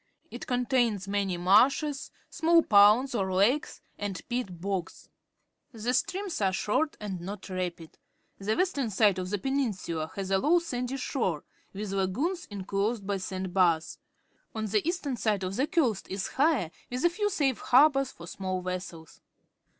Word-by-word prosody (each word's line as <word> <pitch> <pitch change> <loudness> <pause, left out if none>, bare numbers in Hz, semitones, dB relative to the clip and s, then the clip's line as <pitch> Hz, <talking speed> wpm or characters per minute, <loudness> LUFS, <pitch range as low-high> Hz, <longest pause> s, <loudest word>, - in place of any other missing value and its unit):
It - - -8
contains 245 -5 +1
many 200 -2 -1
marshes, 265 - +3 0.2
small 330 +1 +4
ponds 210 +6 +5
or 195 -5 -1
lakes, 210 +11 +1 0.2
and 205 -2 -3
peat 240 -8 -3
bogs. 190 -1 -4 0.6
The 230 +2 -2
streams 370 - -1
are 190 -1 +3
short 215 +11 0
and 195 -4 -5
not 195 +2 -7
rapid. 180 -3 -5 0.4
The 210 +3 -1
western 295 -10 0
side 200 -2 +3
of 185 0 -4
the 205 - 0
peninsula 195 - -2
has 195 -1 -4
a 195 - +3
low 315 - +4
sandy 260 -6 -3
shore, 190 - -2 0.3
with 200 0 -5
lagoons 230 - -1
inclosed 200 +2 -2
by 200 0 -1
sand 185 -1 -5
bars. 170 -4 +2 0.6
On 220 0 -2
the 210 0 +1
east 355 -2 -3
ern 265 -4 -2
side 210 -3 0
the 195 +10 -1
coast 260 - +1
is 195 0 -3
higher, 270 - +1 0.2
with 250 +6 -2
a - - +6
few 415 +3 0
safe 285 - 0
harbours 275 0 +4
for 170 - -12
small 185 +1 -3
vessels. 180 -3 -6
210 Hz, 160 wpm, -28 LUFS, 190-270 Hz, 0.6 s, a